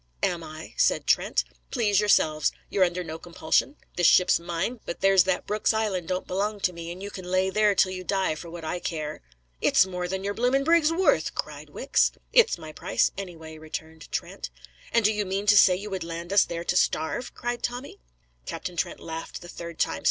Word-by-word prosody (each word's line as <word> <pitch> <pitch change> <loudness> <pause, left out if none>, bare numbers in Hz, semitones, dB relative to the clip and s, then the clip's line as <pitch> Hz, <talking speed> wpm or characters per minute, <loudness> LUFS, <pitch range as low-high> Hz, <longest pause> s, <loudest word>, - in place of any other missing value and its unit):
"Am 170 -1 0
I?" 155 0 -9
said - - +2
Trent. 65 - +2 0.3
"Please 205 -4 +2
yourselves. 155 -7 +3 0.2
You're 195 - +3
under 180 0 0
no 160 -1 -7
compulsion. 170 - 0 0.2
This 175 - +5
ship's 180 - +5
mine, 175 +8 -3
but 170 - -6
there's 195 -2 +5
that 190 -1 0
Brooks 210 +1 +1
Island 200 -6 -1
don't 185 0 -2
belong 205 +3 -2
to 180 -2 +1
me, 170 0 -7
and 185 +3 -8
you 205 - -6
can 185 - -8
lay 185 +1 +1
there 210 0 +3
till 185 - +3
you 185 0 -5
die 190 -3 0
for 165 +2 -9
what 165 -1 -8
I 175 +3 -2
care." 155 -3 -4 0.4
"It's - - +5
more 180 -1 -4
than 190 +1 -3
your 200 +1 -1
blooming 250 +5 +2
brig's 330 0 +4
worth!" 365 +3 +2
cried - - -5
Wicks. - - +1 0.2
"It's 470 -2 +5
my 155 -1 -9
price - - 0
anyway," 160 -5 -8
returned 160 0 -8
Trent. - - -4 0.4
"And 230 -2 +3
do 215 - +4
you 210 0 0
mean 195 +1 -2
to 210 0 +6
say 190 -2 +7
you 205 +3 -6
would 190 -3 -3
land 170 +2 -5
us 200 - +6
there 170 0 -5
to 175 - -1
starve?" 180 +7 0
cried 240 0 -3
Tommy. 245 +2 -5 0.5
Captain 180 -1 -5
Trent - - -2
laughed 165 0 -6
the - - -9
third 170 -1 -8
time. - - 0
185 Hz, 210 wpm, -26 LUFS, 170-205 Hz, 0.5 s, say